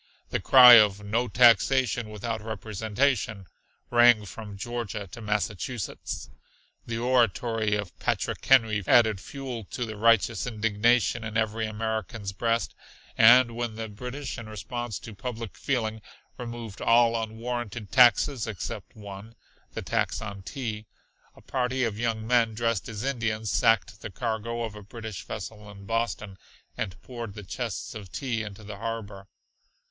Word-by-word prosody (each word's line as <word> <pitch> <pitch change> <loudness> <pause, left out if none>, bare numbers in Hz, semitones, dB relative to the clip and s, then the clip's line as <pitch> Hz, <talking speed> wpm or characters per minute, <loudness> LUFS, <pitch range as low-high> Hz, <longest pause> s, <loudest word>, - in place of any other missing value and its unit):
The - - 0
cry 125 -3 +10
of 105 -1 +2
"no 115 +4 0
taxation 120 0 +4
without 110 +1 -4
representation" 110 +1 -1 0.5
rang 120 -3 +6
from 105 0 -9
Georgia 110 -2 -4
to 120 - -9
Massachusetts. 105 +1 -3 0.6
The 115 -1 -3
oratory 115 -3 +1
of 105 -3 -5
Patrick - - -2
Henry 110 -6 +4
added 110 -4 +5
fuel 130 -2 -6
to 120 - -4
the 110 -1 -7
righteous 115 +2 +3
indignation 115 +1 +1
in 110 0 -3
every 110 0 0
American's 110 -1 -3
breast, 115 +3 -1 0.4
and 120 +1 +7
when 120 -2 -3
the 110 0 -5
British 125 +5 -6
in 110 -2 -9
response 120 +2 -5
to 115 - -10
public 115 0 -6
feeling 110 -5 -2 0.3
removed 115 -4 -7
all 115 0 +4
unwarranted 115 -1 -5
taxes 125 0 +5
except 105 +1 -6
one 105 +1 -10 0.4
the - - -4
tax - - -1
on 100 -2 -7
tea, 110 0 -5 0.5
a - - -17
party 130 0 -1
of 110 -3 -2
young 115 -2 -1
men 115 -2 +2
dressed 115 -2 -1
as 110 0 -5
Indians 115 -5 -1
sacked 105 -2 +2
the - - -6
cargo 115 +2 -3
of 110 -2 -4
a 105 - -10
British 110 -1 -8
vessel 105 -2 -7
in 100 -1 -12
Boston, 110 -3 -2 0.4
and 90 -1 -4
poured 115 -5 -7
the 105 - -8
chests - - -5
of 100 -5 -9
tea 115 +4 -2
into 105 0 -8
the 100 -1 -8
harbor. 105 -3 -6
115 Hz, 145 wpm, -27 LUFS, 105-120 Hz, 0.6 s, cry